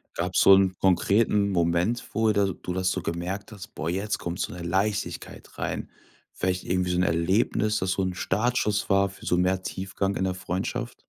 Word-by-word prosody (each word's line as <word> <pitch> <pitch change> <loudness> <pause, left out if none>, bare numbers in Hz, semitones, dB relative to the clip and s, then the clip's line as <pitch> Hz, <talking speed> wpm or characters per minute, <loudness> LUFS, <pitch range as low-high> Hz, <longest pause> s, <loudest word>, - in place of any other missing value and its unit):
Gab's 90 +2 +1
so 95 - +8
'n 95 -1 +4
konkreten 100 +2 +3
Moment, 85 +7 +1
wo 110 -1 +3
de 100 -2 +1
du 90 - -4
das 95 0 0
so 95 - -2
gemerkt: 90 +6 -4 0.2
„Boah, 80 +1 -3
jetzt 100 +4 -2
kommt 85 +1 -4
so - - -2
'ne 90 - -8
Leichtigkeit 100 +4 -3
rein.“ - - -3 0.4
Vielleicht 90 0 -2
irgendwie 90 0 0
so 90 - 0
'n 90 - +3
Erlebnis, 100 +5 +1
das 95 0 -1
so 95 - 0
'n 95 - -1
Startschuss 105 +2 0
war 100 0 +4
für 95 - -13
so 90 - +2
mehr 95 +1 +1
Tiefgang 95 +1 -3
in 95 - -1
der 95 -1 -1
Freundschaft? 95 +7 -4
95 Hz, 190 wpm, -26 LUFS, 90-100 Hz, 0.4 s, so